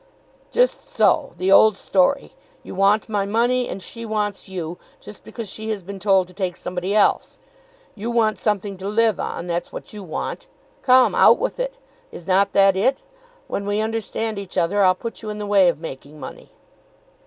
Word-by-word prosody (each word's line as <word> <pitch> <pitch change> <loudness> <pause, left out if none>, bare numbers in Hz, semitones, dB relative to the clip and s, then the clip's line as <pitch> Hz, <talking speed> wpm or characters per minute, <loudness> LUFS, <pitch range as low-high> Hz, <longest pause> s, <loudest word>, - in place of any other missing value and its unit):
"Just - - +1
so; 325 - +2
the 185 +2 0
old 215 0 +6
story. 200 +11 +1 0.3
You - - -9
want 200 +3 +2
my 205 -3 -1
money, 240 +4 +1
and 190 - -6
she 230 - -8
wants 210 -3 -3
you, 175 -2 -5 0.2
just 210 - -12
because 230 -3 -7
she 220 +3 -6
has 210 -4 -3
been 195 +2 -8
told 195 -2 +3
to 180 - -17
take 185 -2 -3
somebody 180 +3 -3
else. 210 - +2 0.6
You 225 +2 -5
want 225 -2 +1
something 205 -2 -1
to 190 +1 -6
live 220 0 +2
on; 170 - -4
that's 170 0 -3
what - - -9
you 210 - -8
want. 175 -5 -5 0.3
Come; 255 -1 +5
out - - +6
with - - -3
it. - - -3 0.3
Is 170 - -10
not 195 +2 +2
that 195 -1 +5
it? 260 +8 +1 0.4
When 200 - -4
we 205 +1 -1
understand 220 -1 -2
each 195 -1 -8
other 185 +4 +2
I'll 185 -1 +5
put 230 +4 -7
you 215 - -6
in 210 - -5
the 210 - -4
way 200 -3 +4
of 170 - -3
making 150 -1 -9
money." - - -10
205 Hz, 190 wpm, -22 LUFS, 185-220 Hz, 0.6 s, old